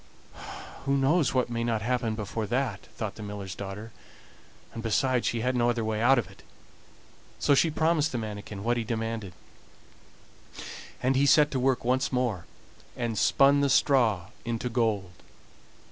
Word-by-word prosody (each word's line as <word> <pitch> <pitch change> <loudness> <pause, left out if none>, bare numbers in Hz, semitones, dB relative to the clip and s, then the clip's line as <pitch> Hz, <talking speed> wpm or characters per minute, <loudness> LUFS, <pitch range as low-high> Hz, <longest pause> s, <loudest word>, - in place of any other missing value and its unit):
"Who 140 0 +2
knows 145 +3 +3
what 125 -1 +1
may 115 0 -1
not 115 -3 -1
happen 120 -2 0
before 110 0 -4
that?" 120 -4 -2
thought 110 -3 -3
the - - -11
miller's 100 -2 -6
daughter; 100 +4 -7 0.8
and 115 - -5
besides, 125 +2 +1
she 115 - -1
saw 125 - +2
no 120 -1 +2
other 120 -2 0
way 110 0 -1
out 130 +3 +5
of 115 -7 0
it, - - -16 1.0
so - - +3
she 160 +4 +4
promised 160 0 +1
the 120 - -2
manikin 105 -2 -6
what 120 +2 +1
he 115 - -1
demanded, 110 -4 -3 1.7
and 130 +2 +2
he 140 +2 +3
set 150 +1 +5
to 130 - -1
work 130 -1 +1
once 130 +3 +1
more 120 -10 -1 0.5
and 120 -2 -2
spun 140 +6 +4
the 140 - +2
straw 115 - +3
into 120 +1 -2
gold. 110 -6 0
120 Hz, 160 wpm, -28 LUFS, 110-130 Hz, 1.7 s, out